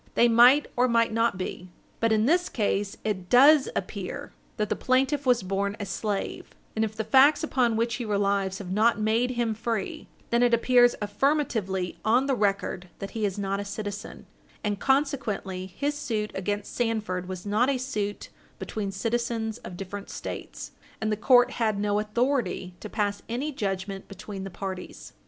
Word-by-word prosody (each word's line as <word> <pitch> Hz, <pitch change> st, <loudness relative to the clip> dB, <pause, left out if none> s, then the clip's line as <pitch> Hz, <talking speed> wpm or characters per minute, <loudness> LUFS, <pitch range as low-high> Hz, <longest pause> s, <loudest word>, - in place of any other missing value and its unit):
They 235 Hz, -, +5 dB
might 245 Hz, +5 st, +6 dB
or 250 Hz, +1 st, +3 dB
might 230 Hz, -2 st, +2 dB
not 230 Hz, -3 st, +1 dB
be. 185 Hz, 0 st, -5 dB, 0.3 s
But 230 Hz, 0 st, +2 dB
in 215 Hz, 0 st, +3 dB
this 350 Hz, +6 st, +2 dB
case 205 Hz, -2 st, -1 dB
it 185 Hz, -4 st, -3 dB
does 280 Hz, +3 st, +7 dB
appear -, -, -5 dB, 0.2 s
that 210 Hz, -2 st, -1 dB
the -, -, +1 dB
plaintiff 265 Hz, +2 st, +1 dB
was 245 Hz, -5 st, +4 dB
born 200 Hz, +2 st, -1 dB
a 205 Hz, -, -3 dB
slave, 200 Hz, +1 st, -4 dB, 0.2 s
and 220 Hz, -, +1 dB
if 215 Hz, -1 st, -3 dB
the 220 Hz, -, -2 dB
facts 280 Hz, +6 st, +5 dB
upon 250 Hz, -7 st, +1 dB
which 230 Hz, +1 st, 0 dB
he 245 Hz, -, -4 dB
relies 200 Hz, -2 st, 0 dB
have 185 Hz, -3 st, -7 dB
not 220 Hz, +4 st, +3 dB
made 225 Hz, +3 st, +2 dB
him 235 Hz, -2 st, +1 dB
free, 225 Hz, -2 st, -3 dB, 0.2 s
then 235 Hz, 0 st, +3 dB
it 240 Hz, -1 st, +5 dB
appears 245 Hz, +1 st, +4 dB
affirmatively 210 Hz, -, 0 dB
on 240 Hz, +5 st, +3 dB
the 275 Hz, -, +1 dB
record 195 Hz, -4 st, -1 dB
that 195 Hz, 0 st, -6 dB
he 220 Hz, 0 st, -1 dB
is 195 Hz, -1 st, -2 dB
not 195 Hz, 0 st, -1 dB
a -, -, -2 dB
citizen, 205 Hz, 0 st, -6 dB, 0.4 s
and 205 Hz, -2 st, -1 dB
consequently 245 Hz, -9 st, 0 dB
his 285 Hz, +10 st, -2 dB
suit 230 Hz, -8 st, -3 dB
against 205 Hz, +2 st, -3 dB
Sandford 215 Hz, -6 st, -1 dB
was 185 Hz, 0 st, -6 dB
not 215 Hz, +6 st, +2 dB
a 275 Hz, -, +1 dB
suit 210 Hz, -6 st, -3 dB, 0.3 s
between 205 Hz, -3 st, -4 dB
citizens 230 Hz, +1 st, -2 dB
of 175 Hz, -, -9 dB
different 195 Hz, +1 st, -7 dB
States, -, -, -7 dB, 0.3 s
and 215 Hz, 0 st, -1 dB
the -, -, +2 dB
court 245 Hz, +3 st, +5 dB
had 220 Hz, -3 st, 0 dB
no 205 Hz, 0 st, +1 dB
authority 235 Hz, -3 st, -1 dB
to -, -, -8 dB
pass 205 Hz, -1 st, -1 dB
any 265 Hz, +6 st, -2 dB
judgment 195 Hz, -4 st, -4 dB
between 195 Hz, 0 st, -7 dB
the -, -, -5 dB
parties. 185 Hz, -, -7 dB
215 Hz, 175 wpm, -27 LUFS, 200-245 Hz, 0.4 s, does